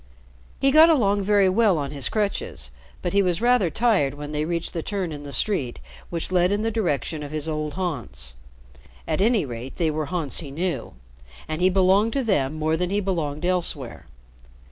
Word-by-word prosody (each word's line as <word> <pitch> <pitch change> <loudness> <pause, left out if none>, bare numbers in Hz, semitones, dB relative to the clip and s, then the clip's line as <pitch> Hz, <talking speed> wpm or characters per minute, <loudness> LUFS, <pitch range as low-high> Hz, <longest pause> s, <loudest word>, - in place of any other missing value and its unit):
He 275 - +3
got 315 +3 +8
along 205 -10 +3
very 200 0 +4
well 200 -1 +3
on 140 -2 -3
his 140 -3 -2
crutches, 200 - -2 0.3
but 175 - -2
he 200 - +4
was 180 -2 0
rather 240 -6 +3
tired 175 - +2
when 145 0 -7
they 150 0 -1
reached 170 0 -2
the 165 - -2
turn 190 -2 -3
in 145 -1 -6
the 145 -1 -8
street 140 - 0 0.3
which 170 +1 -4
led 180 0 +3
in 205 +1 0
the 225 - 0
direction 165 -7 -1
of 145 - -6
his 155 0 -2
old 155 -1 -3
haunts. 120 - -4 0.7
At - - 0
any 220 -4 +3
rate, 120 +1 -7
they 165 -3 +1
were 155 -1 -2
haunts 160 -4 -2
he 150 - -6
knew, 170 +5 -3 0.5
and 155 +2 -3
he 185 - +5
belonged 195 +4 +3
to 275 - 0
them 155 - +1
more 155 +1 0
than 180 +1 -1
he 200 +2 +1
belonged 170 -5 -2
elsewhere. 170 -9 -2
175 Hz, 195 wpm, -24 LUFS, 150-200 Hz, 0.7 s, got